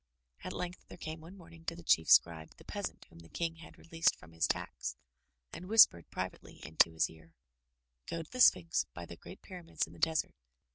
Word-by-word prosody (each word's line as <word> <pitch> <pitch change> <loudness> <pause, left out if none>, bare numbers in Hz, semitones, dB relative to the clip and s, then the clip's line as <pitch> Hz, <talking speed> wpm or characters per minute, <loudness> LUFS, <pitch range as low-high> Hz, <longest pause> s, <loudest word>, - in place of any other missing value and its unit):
At - - -5
length 180 0 -6
there - - -11
came 160 -1 -7
one 175 +5 -12
morning 165 -2 -15
to 170 - -3
the 170 - -12
Chief 80 - +3
Scribe 80 -2 +4
the - - -15
peas - - -3
ant - - -20
whom 85 - -16
the 80 0 -15
King 165 -1 -3
had 165 - -14
released 165 0 +1
from 80 - -16
his 80 -1 0
tax, - - -3 0.6
and 180 - -8
whispered 210 - +6
privately - - -6
into 80 +1 +4
his 80 - +2
ear: 80 0 -17 0.7
"Go 165 -1 -4
to 155 - -21
the 255 - -2
Sphinx 175 -7 +4
by 85 - -7
the 85 - -10
great 185 - -13
pyramids 180 -3 -4
in - - -16
the - - -14
desert. 160 -1 +1
165 Hz, 210 wpm, -33 LUFS, -, 0.7 s, whispered